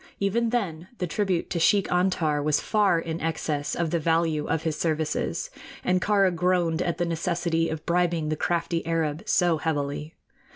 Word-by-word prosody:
Even 225 +4 +1
then 185 -8 -2
the 180 - -1
tribute 185 0 -1
to 170 - 0
Sheik 195 +4 +3
Antar 175 -5 +1
was 150 0 +2
far 205 -5 +2
in 165 0 -4
excess 155 -2 -2
of 170 -2 -1
the 170 - +1
value 160 -1 +1
of 160 - -1
his 160 -2 -1
services, 160 - -1 0.3
and 185 0 +2
Kāra 200 -3 +3
groaned 175 -1 +1
at 170 -2 -1
the 175 - 0
necessity 170 0 0
of 160 -1 -5
bribing 170 -2 +1
the 155 - 0
crafty 170 +1 -1
Arab 160 -1 -1
so 175 -3 +3
heavily. 150 0 -2
165 Hz, 170 wpm, -26 LUFS, 160-180 Hz, 0.3 s, Sheik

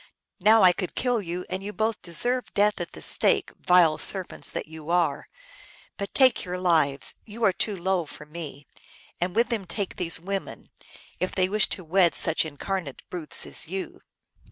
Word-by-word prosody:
Now 215 +4 +5
1 180 -1 +7
could 185 - -4
kill 245 -3 0
you, 180 0 -5
and 185 +1 -4
you 205 +1 -6
both 220 0 -2
deserve 245 +9 0
death 205 -1 +2
at 175 - -6
the - - -10
stake, - - +1
vile 170 -4 +4
serpents 190 +3 0
that - - -4
you 160 0 -11
are; 170 -5 0 0.7
but 200 - -6
take 260 -2 +4
your 180 -2 -4
lives, 160 -6 +3
you 225 +2 -8
are 195 - +4
too 210 +2 -2
low 185 -2 -1
for 150 +2 -10
me, 150 -3 -9 0.5
and 175 +2 -2
with 235 +2 +2
them 225 -5 -2
take 195 +2 -4
these 170 -2 +1
women, 195 +3 -6 0.5
if 185 - -2
they 185 -1 +2
wish 210 +1 +4
to 185 - -5
wed 175 +1 +3
with - - +1
such 160 - +4
incarnate 160 0 -5
brutes 175 -4 +2
as - - -1
you 190 +3 -6
185 Hz, 185 wpm, -25 LUFS, 165-200 Hz, 0.7 s, 1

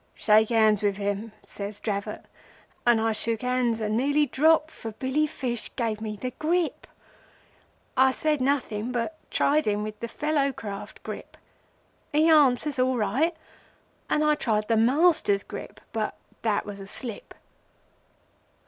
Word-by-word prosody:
'Shake 215 0 +4
hands 220 -3 +4
with 200 -2 +1
him,' 205 +2 -2
says 200 0 -3
Dravot, 200 -2 -4 0.6
and 240 -2 +5
I 225 0 +1
shook 225 +1 -2
hands 250 -2 +1
and 215 -1 -1
nearly 285 +5 +3
dropped, 315 +3 +3
for 225 -2 -7
Billy 265 +6 0
Fish 240 -5 -4
gave 225 -3 -2
me 215 -1 -4
the 250 +5 -4
Grip. 335 +1 0 1.1
I 265 0 +5
said 300 +1 0
nothing, 250 -4 0
but 250 +6 -3
tried 295 -1 +2
him 210 0 +1
with 215 0 -6
the 235 - -4
Fellow 290 +2 0
Craft 200 -4 -8
Grip. - - -8 0.7
He 305 +2 +4
answers, 290 -3 +4
all 255 0 +2
right, 310 +9 +1 0.7
and 300 - +2
I 300 0 +4
tried 215 -7 0
the 225 - +4
Master's 260 - +3
Grip, 205 - -8
but 220 -1 -2 0.3
that 215 -3 0
was 205 -1 -7
a 195 - -9
slip. 230 +1 -7
240 Hz, 150 wpm, -26 LUFS, 215-290 Hz, 1.1 s, and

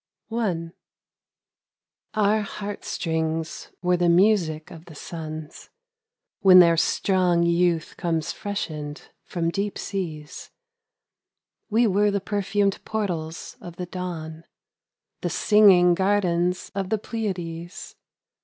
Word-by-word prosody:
A - - -7
LAMENTATION. 175 -8 -2 1.4
OUR 215 0 +3
heart 205 0 -6
strings 160 -1 -2
were 180 0 +3
the 175 0 +2
music 170 -4 +2
of 165 0 -11
the 160 - -13
suns 155 0 -8 0.7
When 190 -3 +7
their 170 -2 +7
strong 175 +1 +2
youth 170 -1 +1
comes 165 -3 -1
freshened 155 -7 -5 0.2
from 170 -1 -2
deep 200 +3 -2
seas; 160 -6 -5 1.2
We 230 +2 +3
were 205 0 +3
the 200 0 0
perfum'd 200 0 -1
portals 175 -7 -4
of 175 -1 -9
the 180 - -5
dawn 165 -3 -6 0.4
— - - -60
The - - -1
singing 195 -5 +5
gardens 180 -2 +1
of 195 -1 -3
the 220 - +1
Pleiades. 180 -6 -5
180 Hz, 115 wpm, -24 LUFS, 165-200 Hz, 1.4 s, When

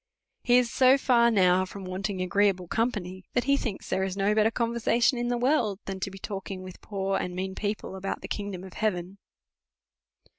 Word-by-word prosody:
He 245 0 +4
is 245 -2 +2
so 260 +1 +5
far 240 -3 +4
now 185 -4 +4
from 190 +1 -8
wanting 185 +1 -3
agreeable 190 -1 +1
company, 190 -4 -2
that 245 - +2
he 280 +1 +3
thinks 230 -8 -4
there 190 - 0
is 190 0 -3
no 200 +1 +2
better 215 +1 +4
conversation 235 +1 +1
in 240 - -1
the 245 0 0
world, 240 -6 +1
than 195 -1 -5
to 195 - -2
be 195 - -10
talking 195 -1 -6
with 185 -1 -10
poor 195 -1 -2
and 180 0 -4
mean 190 +1 -3
people 205 -1 -4
about 195 +1 -4
the - - -7
kin,^dom 200 -3 -5
of 185 - -11
heaven. 195 -2 -2
200 Hz, 195 wpm, -27 LUFS, 190-235 Hz, -, so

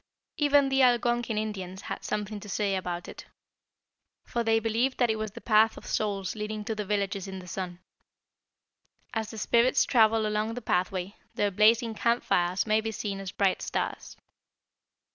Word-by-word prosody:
"Even 285 -2 +4
the 270 0 +3
Algonquin 240 -2 +2
Indians 190 -3 -4
had - - -5
something 210 0 -3
to 205 - -10
say 200 -1 0
about 180 -2 -4
it, - - -10 1.0
for 235 - -2
they 225 0 +3
believed 230 +4 0
that 245 -3 +3
it - - -1
was 215 0 -3
the - - -9
'Path 220 0 +4
of - - -11
Souls' 195 -3 -1
leading 210 0 -4
to 220 - -2
the 210 -1 -3
villages 200 -1 -2
in 190 0 -6
the 185 - -9
sun. 180 -1 -5 1.4
As 220 -2 -2
the 220 - -9
spirits 235 +3 +3
travel 225 -2 +4
along 215 +1 -1
the - - -3
pathway, 185 +1 -1 0.2
their 205 -1 +1
blazing 225 +4 +4
camp 235 +2 +1
fires 175 +2 +1
may 215 0 +2
be 220 0 -3
seen 200 -2 -4
as 195 -2 -6
bright 195 -2 +1
stars. - - -4
215 Hz, 175 wpm, -28 LUFS, 195-225 Hz, 1.4 s, Even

